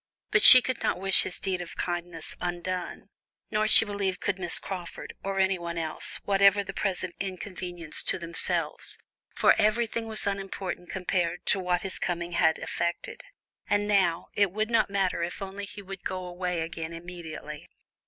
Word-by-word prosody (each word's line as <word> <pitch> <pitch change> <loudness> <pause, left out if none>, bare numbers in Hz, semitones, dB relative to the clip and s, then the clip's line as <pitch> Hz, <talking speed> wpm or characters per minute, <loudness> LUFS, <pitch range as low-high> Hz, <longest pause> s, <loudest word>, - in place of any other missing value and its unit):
But - - +4
she 255 -2 +12
could 255 -2 -3
not - - 0
wish 195 0 +6
his 180 - -1
deed 185 -2 -2
of 175 - -9
kindness 175 -2 -4
undone, 180 +1 -4 0.4
nor 215 0 +1
she 220 - +8
believed 200 -2 -2
could 195 -2 -2
Miss 175 -2 +1
Crawford, 180 -3 -7
or 195 0 -3
anyone 180 -3 0
else, 160 -1 -3
whatever 200 0 +4
the - - -7
present 185 -3 -2
inconvenience 180 -3 -5
to - - +1
themselves, 170 -1 -1 0.4
for - - +5
everything 225 +1 +1
was 220 -1 -3
unimportant 195 -2 -4
compared 180 -2 -1
with 195 -2 -3
what 180 -1 0
his 195 - -1
coming 175 -1 -3
had 160 -1 +3
effected; 170 0 -4 0.5
and 205 0 +1
now, 185 -5 +1
it 200 -3 +2
would 215 +3 -2
not 230 - +3
matter 195 -3 0
if 170 +1 -4
only 195 +1 -6
he 205 +1 -11
would 195 -1 -9
go 185 -1 -4
away 180 -1 -3
again 165 0 -5
immediately. 165 -3 -8
185 Hz, 165 wpm, -27 LUFS, 175-200 Hz, 0.5 s, she